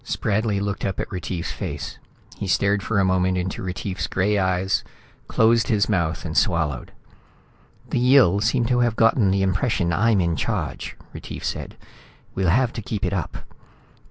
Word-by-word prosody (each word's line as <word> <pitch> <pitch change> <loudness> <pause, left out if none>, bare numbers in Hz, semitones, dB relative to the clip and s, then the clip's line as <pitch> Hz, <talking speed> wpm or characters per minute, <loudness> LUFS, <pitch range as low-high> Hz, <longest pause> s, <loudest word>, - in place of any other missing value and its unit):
Spradley 105 0 0
looked 100 0 -3
up 95 -2 -2
at - - -4
Retief's 90 -2 -4
face. 70 -2 -5 0.4
He 100 - -5
stared 100 +2 +2
for 110 +2 -1
a 100 - +3
moment 95 0 +2
into 90 +1 -3
Retief's 95 +1 -3
gray 100 +2 +1
eyes, 95 0 +1 0.4
closed 115 +1 +3
his 105 -3 +2
mouth 85 -7 -1
and 80 -1 -4
swallowed. 80 - +1 1.0
"The - - +1
Yill 125 -7 +5
seem 115 +2 +1
to 120 +1 +2
have 120 -2 +2
gotten 115 -2 +4
the 95 0 +2
impression 95 -2 +1
I'm 110 +4 +3
in 85 -2 +1
charge," - - -3 0.2
Retief - - -8
said, - - -4 0.6
"We'll 95 -2 +1
have 125 +6 +2
to 120 - -5
keep 105 -1 -3
it - - -1
up." - - -4
100 Hz, 165 wpm, -23 LUFS, 90-110 Hz, 1.0 s, Yill